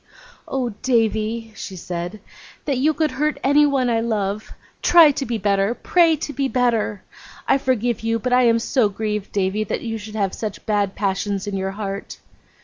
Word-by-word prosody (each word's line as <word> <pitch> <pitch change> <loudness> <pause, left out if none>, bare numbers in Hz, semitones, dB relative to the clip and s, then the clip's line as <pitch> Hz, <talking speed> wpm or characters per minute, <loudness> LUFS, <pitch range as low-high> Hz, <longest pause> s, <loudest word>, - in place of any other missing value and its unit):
'Oh, 260 -3 -1
Davy!' 225 -2 0
she 190 - -7
said. 175 +3 -5 0.4
'That 275 -4 0
you 300 +4 +3
could 310 -1 0
hurt 300 +4 -1
anyone 280 -2 +3
I 230 -1 +2
love! 215 -2 -2 0.3
Try 335 -4 +7
to 275 -1 -4
be 235 - -1
better, 200 +2 +1
pray 335 +1 +3
to 295 -1 -5
be 275 +1 0
better! 235 -6 0 0.4
I 275 - +4
forgive 245 -3 0
you; 225 0 0
but 250 +3 -2
I 250 - +5
am 230 0 +4
so 230 -1 +1
grieved, 210 0 -3
Davy, 200 +2 0
that 215 - -3
you 225 -2 -4
should 215 +1 -9
have 195 -3 0
such 215 -3 -5
bad 205 -2 0
passions 200 0 -1
in 205 -1 -3
your 190 0 -2
heart. 200 -1 -5
225 Hz, 180 wpm, -21 LUFS, 205-255 Hz, 0.4 s, Try